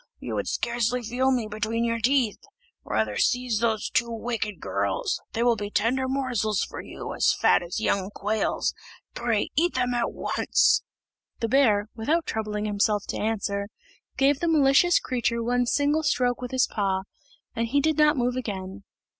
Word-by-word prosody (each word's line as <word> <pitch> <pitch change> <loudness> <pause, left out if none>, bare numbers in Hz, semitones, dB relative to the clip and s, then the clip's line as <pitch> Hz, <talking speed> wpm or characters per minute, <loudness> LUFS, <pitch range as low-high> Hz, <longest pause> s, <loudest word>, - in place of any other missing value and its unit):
You - - -6
would - - -2
scarcely 240 +1 -1
feel 250 +4 0
me 245 -4 0
between 215 +2 -2
your 230 0 0
teeth. 245 -2 +2 0.4
Rather - - -1
seize 245 -3 +1
those 225 -2 0
two 235 0 0
wicked 225 -2 -3
girls; - - -2
they 230 - 0
will 240 -1 +4
be 205 -1 -5
tender 255 +5 +1
morsels 245 -6 0
for - - -6
you, - - -7
as - - +2
fat - - +4
as 175 +4 -4
young 200 -3 0
quails; 210 +1 -1 0.4
pray, 230 -3 -1
eat 345 +5 +2
them 250 -1 +1
at 240 -1 0
once." - - +2 0.6
The 230 -2 -1
bear, 220 -6 +3
without 305 +9 0
troubling 210 -1 -3
himself 205 0 +1
to - - -2
answer, 200 -2 -1 0.5
gave 275 +1 +3
the 340 - -1
malicious 310 +2 +5
creature 235 -2 -1
one 245 +1 +1
single 290 +4 +2
stroke 250 -4 +1
with 250 - -4
his 260 0 +2
paw, 195 -3 -1 0.5
and 230 0 -1
he 280 +5 +2
did 310 +2 +1
not 300 0 +5
move 245 0 0
again. 200 -5 -5
235 Hz, 170 wpm, -25 LUFS, 215-260 Hz, 0.6 s, malicious